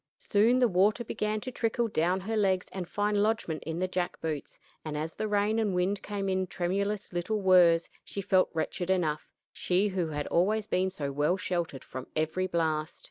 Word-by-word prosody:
Soon 220 +5 +3
the 250 -1 +4
water 205 +4 +2
began 215 -1 -2
to 255 - -5
trickle 230 0 0
down 180 -1 +1
her 220 +4 -3
legs 190 -3 +2
and 180 -2 -5
find 205 +1 +1
lodgment 210 -7 0
in 160 0 -3
the 185 +1 0
jack 180 -1 -2
boots, 155 -3 -4 0.3
and 150 -1 -4
as 155 +2 -3
the 215 - -3
rain 210 +2 +1
and 210 -4 0
wind 190 +3 0
came 200 -1 -3
in 190 -1 0
tremulous 195 +3 -2
little 180 +5 -1
whirs, 180 -3 +5 0.2
she - - -6
felt 185 -1 +3
wretched 175 +2 -3
enough 165 -5 0 0.3
she 190 +3 +1
who 185 -3 -1
had 150 -2 -3
always 210 +5 +2
been 185 -1 +1
so 145 -7 -4
well 150 +6 +1
sheltered 170 -7 -3
from 130 0 -8
every 160 +4 0
blast. 160 -3 -1
185 Hz, 190 wpm, -29 LUFS, 170-205 Hz, 0.3 s, whirs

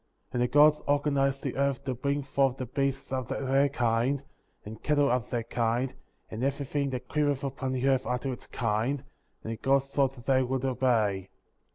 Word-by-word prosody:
^ - - -44
25. - - -28
And 120 - 0
the 125 +4 +1
God^ 150 +1 +6
organized 140 -1 +1
the 135 - -3
earth 140 -1 0
to 130 - -2
bring 140 +3 -1
forth 135 -1 +1
the 130 - -3
beasts 135 +2 -2
after 130 -2 -2
their 135 +2 +3
kind, 125 +2 +1 0.4
and 110 +1 -9
cattle 145 -3 +2
after 125 -3 0
their 120 -2 -1
kind, 120 +2 0 0.4
and 110 +3 -4
every 140 +1 -1
thing 140 +1 -1
that 125 -2 -5
creepeth 145 -2 0
upon 135 -1 -3
the 130 +1 0
earth 135 -1 +2
after 125 +2 -1
its - - -10
kind; 115 +5 -1 0.4
and 115 - -3
the - - -7
Gods 135 +2 +1
saw 140 -1 +3
they 130 0 0
would 130 +1 -1
obey. 110 -8 +1
130 Hz, 200 wpm, -29 LUFS, 120-140 Hz, 0.4 s, God^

